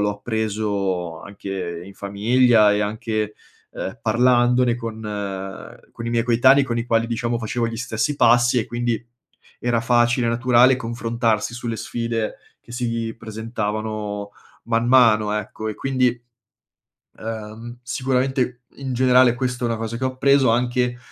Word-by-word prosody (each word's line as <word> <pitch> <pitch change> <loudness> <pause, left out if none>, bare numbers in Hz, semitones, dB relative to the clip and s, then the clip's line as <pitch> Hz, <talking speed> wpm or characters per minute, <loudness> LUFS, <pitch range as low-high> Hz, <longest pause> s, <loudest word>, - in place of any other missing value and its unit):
l'ho 105 0 +2
appreso 100 -7 -2
anche 95 -4 -6
in 100 - -12
famiglia 105 +2 +3
e 105 - +1
anche, 105 0 -2 0.4
uhm, 95 +5 -6
parlandone 120 +1 +3
con 115 -2 -6 0.9
con 115 - -8
i - - -2
miei 115 0 +1
coetanei, 130 +4 +5
con 120 -2 -2
i 115 - -2
quali 115 0 +2
diciamo 120 0 -2
facevo 115 +1 -2
gli 115 - -5
stessi 120 +5 -2
passi 120 0 +4
e 110 - -1
quindi 120 -1 -1 0.6
era 120 -1 +1
facile 120 +1 +2
e 115 - +2
naturale 125 +1 +4
confrontarsi 115 -1 -1
sulle 120 -2 -4
sfide 115 -1 -3 0.2
che 120 - -15
si 115 -2 -2
presentavano 110 -2 -4 0.3
man 115 0 0
mano, 110 -5 +5
ecco, 105 +1 -4
e 105 - -4
quindi, 130 -2 +1 1.1
uhm, 115 +2 -7
sicuramente 130 -1 -1
in 135 -2 -5
generale 125 -1 +5
questo 125 -1 -2
è - - +2
una 115 - -1
cosa 115 +1 -4
che 130 - -8
ho - - +2
appreso 135 -1 +3
anche, 125 +1 0
115 Hz, 145 wpm, -22 LUFS, 110-125 Hz, 1.1 s, coetanei